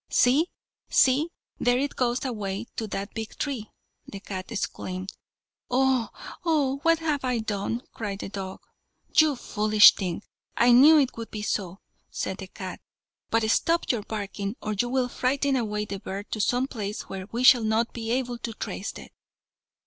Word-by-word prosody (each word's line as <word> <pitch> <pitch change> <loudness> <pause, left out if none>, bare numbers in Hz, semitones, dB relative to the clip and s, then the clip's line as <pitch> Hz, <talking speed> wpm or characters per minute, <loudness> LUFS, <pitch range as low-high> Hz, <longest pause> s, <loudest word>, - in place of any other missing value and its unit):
"See, 285 +8 +4 0.4
see, 275 +5 +4 0.3
there 245 0 +3
it 280 +2 -1
goes 245 +1 0
away 210 -3 -3
to 220 - -3
that 195 0 -5
big 220 -1 -6
tree," 255 -8 -3 0.4
the 200 - -8
cat 190 +1 -7
exclaimed. 185 -3 -4 0.6
"Oh! 255 -3 +2 0.3
oh! 295 -5 +1
what 330 +1 +4
have 310 -4 -1
I 250 -2 0
done?" 220 +2 -2
cried 205 -3 -4
the 195 - -6
dog. 190 -1 -6 0.5
"You 310 -2 +5
foolish 215 -3 +6
thing, 185 0 -4 0.3
I 240 +1 +5
knew 285 +6 +8
it 275 -4 +2
would 230 -1 -6
be 210 -1 -5
so," 195 -3 -2 0.3
said - - -3
the - - -7
cat. - - -8 0.5
"But 225 -1 +2
stop 335 +6 +2
your 235 -4 -1
barking, 205 0 -4
or 215 - -3
you 240 +4 0
will 255 0 +1
frighten 270 +3 0
away 210 -4 -1
the 200 -1 -5
bird 195 +1 -6
to 215 - -1
some 245 +5 +2
place 210 -4 -4
where 190 0 -7
we 240 +2 -2
shall 250 -2 +7
not 220 +2 +1
be 225 -1 -5
able 245 0 -1
to 230 - -5
trace - - -5
it." - - -11
230 Hz, 170 wpm, -26 LUFS, 205-260 Hz, 0.6 s, knew